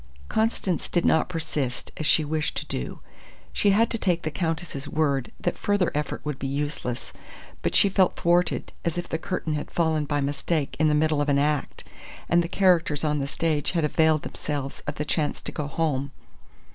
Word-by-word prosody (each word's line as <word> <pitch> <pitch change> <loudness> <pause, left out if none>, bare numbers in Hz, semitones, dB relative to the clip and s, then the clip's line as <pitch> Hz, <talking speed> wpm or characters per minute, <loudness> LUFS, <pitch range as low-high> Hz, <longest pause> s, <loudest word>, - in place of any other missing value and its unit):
Constance 220 -5 0
did 175 - +1
not 160 - +3
persist, 155 -7 -3
as 155 - -2
she 155 - +4
wished 155 0 -1
to - - -3
do. 60 - -5 0.5
She 205 - +3
had 220 +4 +4
to 230 - +1
take 175 -4 +1
the 155 - -2
Countess's 160 -4 -3
word 140 -5 0
that - - -2
further 205 -4 +2
effort 150 0 -3
would 150 -2 -3
be 135 - -2
useless, 140 -3 -3 0.5
but - - -1
she - - +6
felt 190 -1 +3
thwarted, 175 0 +1
as 170 0 -1
if 175 - -3
the 160 - -2
curtain 160 -2 -2
had 150 - -3
fallen 160 -3 +1
by 145 0 0
mistake 145 0 -1
in 155 - +4
the 150 - +3
middle 155 -1 +2
of 145 - 0
an 140 - +4
act, 145 0 0 0.4
and 170 0 +4
the - - -3
characters 170 -6 +3
on 150 -1 +1
the 140 - -1
stage 150 +1 0
had 165 -3 +2
availed 155 0 +3
themselves 140 -2 -4
of 145 - -2
the 150 - -2
chance 150 0 0
to - - -4
go 150 - -3
home. 140 -2 -1
155 Hz, 195 wpm, -26 LUFS, 145-170 Hz, 0.5 s, she